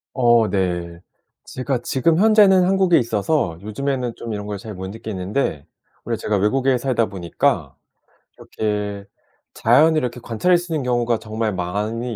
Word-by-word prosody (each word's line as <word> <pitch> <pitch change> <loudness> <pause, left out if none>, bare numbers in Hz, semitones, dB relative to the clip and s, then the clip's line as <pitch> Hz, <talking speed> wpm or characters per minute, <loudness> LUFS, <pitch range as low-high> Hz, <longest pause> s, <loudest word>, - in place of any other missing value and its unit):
어 120 -3 +4
네. 90 -3 -2 0.4
제가 130 0 -3
지금 160 +7 +1
현재는 205 -3 +6
한국에 190 -2 +3
있어서 115 - -1
요즘에는 125 +3 -3
좀 115 - -7
이런 105 0 -5
걸 105 -1 -4
잘 110 -2 -8
못 95 +1 -6
느끼는데 100 - -3 0.4
오히려 - - -2
제가 105 - -1
외국에 130 +6 +2
살다 120 -3 0
보니까 90 -4 -1 0.6
이렇게 105 -2 -4 0.5
자연을 155 +8 +4
이렇게 125 -2 -4
관찰할 170 +11 +1
수 175 0 -9
있는 155 -4 -1
경우가 120 -2 +1
정말 110 0 -3
많이 105 +6 -3
115 Hz, 315 characters per minute, -21 LUFS, 105-135 Hz, 0.6 s, 현재는